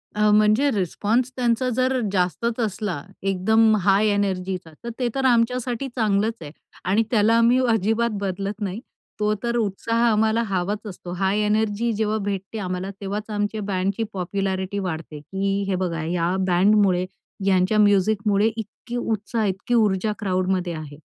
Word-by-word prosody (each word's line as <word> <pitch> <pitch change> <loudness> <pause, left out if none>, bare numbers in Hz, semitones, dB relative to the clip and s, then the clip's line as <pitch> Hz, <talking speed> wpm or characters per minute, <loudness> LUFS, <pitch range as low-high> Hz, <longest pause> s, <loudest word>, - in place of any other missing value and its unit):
अ, 210 0 +3
म्हणजे 215 +6 +4
रिस्पॉन्स 215 +5 0
त्यांचा 250 0 +1
जर 255 +2 +1
जास्तच 200 +6 0
असला, 205 -7 -2 0.2
एकदम 215 +4 +3
हाय 195 +3 +3
एनर्जीचा, 190 -4 -1
तर 235 - -4
ते 250 - +1
तर 270 -1 0
आमच्यासाठी 245 +1 +1
चांगलंच 215 -1 +1
आहे 150 -2 -8 0.3
आणि 200 +5 +2
त्याला 220 -1 +4
आम्ही 235 +2 +4
अजिबात 225 +3 +1
बदलत 195 +2 -3
नाही. 200 +1 -3 0.4
तो 210 0 +2
तर 235 0 -1
उत्साह 230 +2 0
आम्हाला 220 +1 +2
हवाच 195 +3 -2
असतो. 180 -2 -8
हाय 190 +3 0
एनर्जी 215 +2 +1
जेव्हा 215 0 0
भेटते 200 +2 -4
आम्हाला, 185 -1 -3
तेव्हाच 205 +2 -4
आमच्या 210 0 -2
बँडची 195 +2 -1
पॉप्युलॅरिटी 190 +1 -2
वाढते, 160 -5 -5
की 195 +5 -2
हे 195 - 0
बघा 175 -3 -2
या 170 +2 0
बँडमुळे 185 0 +3 0.4
ह्यांच्या 190 +2 +3
म्युझिकमुळे 205 +1 +3
इतकी 225 +2 -7
उत्साह, 220 -1 -1
इतकी 195 +4 -2
ऊर्जा 215 -2 +2
क्राउडमध्ये 185 -3 0
आहे. 155 -2 -8
205 Hz, 145 wpm, -23 LUFS, 190-225 Hz, 0.4 s, म्हणजे